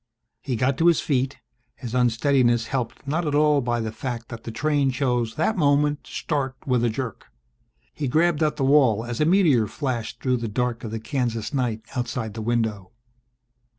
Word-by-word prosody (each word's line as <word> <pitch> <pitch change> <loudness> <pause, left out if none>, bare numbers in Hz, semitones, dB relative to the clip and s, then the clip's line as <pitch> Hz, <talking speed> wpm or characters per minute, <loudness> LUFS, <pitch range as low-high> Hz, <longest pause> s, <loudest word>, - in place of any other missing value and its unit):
He 130 -3 -2
got 130 +4 0
to 165 - +4
his 170 - +5
feet, 135 -1 0 0.4
his 120 -4 -7
unsteadiness 120 -1 +2
helped 125 0 -3
not 160 +3 -1
at 145 - 0
all 150 -1 +4
by 120 -1 -1
the 110 -1 -3
fact 115 0 -5
that 120 - -9
the 115 - -4
train 145 +3 +1
chose 125 -4 0
that 190 +8 +1
moment 145 -2 +2
to - - -14
start 135 -4 -2
with 125 -3 +1
a 120 - +3
jerk. 115 -1 -5 0.7
He 145 - -3
grabbed 160 +3 +2
at 150 -1 +2
the 145 - -2
wall 130 -6 +4
as 120 +3 -4
a - - +4
meteor 160 - +4
flashed 120 -3 -4
through 130 -1 +1
the 115 -1 -3
dark 120 +2 -2
of 115 - -4
the 110 +1 -4
Kansas 115 -1 -2
night 120 -5 -1
outside 120 -3 -3
the 110 - -5
window. 110 -4 -1
125 Hz, 190 wpm, -24 LUFS, 115-145 Hz, 0.7 s, his